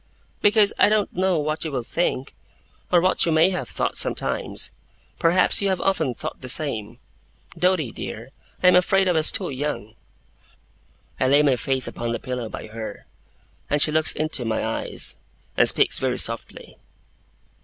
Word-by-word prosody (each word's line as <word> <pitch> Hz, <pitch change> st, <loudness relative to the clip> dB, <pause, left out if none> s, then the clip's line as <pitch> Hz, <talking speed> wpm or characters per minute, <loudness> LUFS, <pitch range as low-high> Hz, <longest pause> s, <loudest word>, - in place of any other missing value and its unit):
'Because 205 Hz, -1 st, +4 dB
I 205 Hz, -, +5 dB
don't 215 Hz, -1 st, 0 dB
know 185 Hz, -1 st, +1 dB
what 155 Hz, +1 st, -2 dB
you 160 Hz, -, -4 dB
will 130 Hz, -3 st, -3 dB
think, 135 Hz, -1 st, -2 dB, 0.6 s
or 175 Hz, -, +5 dB
what 185 Hz, +1 st, +2 dB
you -, -, +1 dB
may 160 Hz, +4 st, +4 dB
have 180 Hz, -, -4 dB
thought -, -, 0 dB
sometimes. -, -, -1 dB, 0.5 s
Perhaps 175 Hz, +4 st, +3 dB
you 200 Hz, -, 0 dB
have 190 Hz, -2 st, 0 dB
often 160 Hz, -10 st, 0 dB
thought -, -, -6 dB
the 130 Hz, -, -8 dB
same. 115 Hz, -6 st, 0 dB, 0.6 s
Doady, 180 Hz, -9 st, 0 dB
dear, -, -, -8 dB, 0.3 s
I 180 Hz, -, +7 dB
am 180 Hz, -, +4 dB
afraid 190 Hz, +1 st, +3 dB
I -, -, +3 dB
was 160 Hz, -2 st, +5 dB
too 190 Hz, -7 st, -1 dB
young.' 130 Hz, -6 st, -4 dB, 1.3 s
I 130 Hz, -, +2 dB
lay 145 Hz, +3 st, +4 dB
my 140 Hz, -3 st, +3 dB
face 130 Hz, +2 st, +1 dB
upon 120 Hz, 0 st, -4 dB
the -, -, -3 dB
pillow 125 Hz, -3 st, -5 dB
by -, -, -8 dB
her, 110 Hz, 0 st, -8 dB, 0.6 s
and 150 Hz, -, +1 dB
she 150 Hz, -, +4 dB
looks 155 Hz, 0 st, +2 dB
into 155 Hz, -4 st, -2 dB
my 110 Hz, -1 st, -2 dB
eyes, 110 Hz, -, -3 dB, 0.4 s
and -, -, +5 dB
speaks -, -, +3 dB
very 130 Hz, -1 st, -1 dB
softly. 115 Hz, 0 st, -4 dB
155 Hz, 170 wpm, -23 LUFS, 125-180 Hz, 1.3 s, I